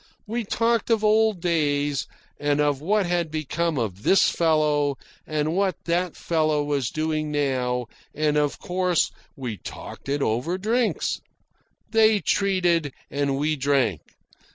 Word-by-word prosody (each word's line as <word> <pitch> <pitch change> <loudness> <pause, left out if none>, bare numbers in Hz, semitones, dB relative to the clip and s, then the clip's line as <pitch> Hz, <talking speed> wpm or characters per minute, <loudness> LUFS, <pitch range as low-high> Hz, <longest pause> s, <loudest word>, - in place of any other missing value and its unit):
We 230 +2 -2
talked 230 +2 0
of 225 -2 +2
old 215 -3 +3
days, 145 -4 0 0.3
and 145 0 +1
of 145 -2 +1
what 200 +5 +2
had 175 -2 0
become 155 +1 -1
of 105 -5 -3
this 190 - +4
fellow, 150 -4 +2 0.3
and 155 +1 -1
what 195 -1 +1
that 175 0 0
fellow 155 -3 +1
was 140 -4 -1
doing 155 -1 -2
now, 130 -4 0 0.3
and 150 0 +1
of 150 -1 +1
course 180 -1 0 0.2
we 125 -6 -5
talked - - -9
it 140 0 0
over 125 +12 0
drinks. 225 +5 0 0.7
They 220 -1 +5
treated, 175 -6 +1 0.2
and 140 -1 0
we 150 +2 +1
drank. 135 - +1
155 Hz, 135 wpm, -24 LUFS, 145-185 Hz, 0.7 s, They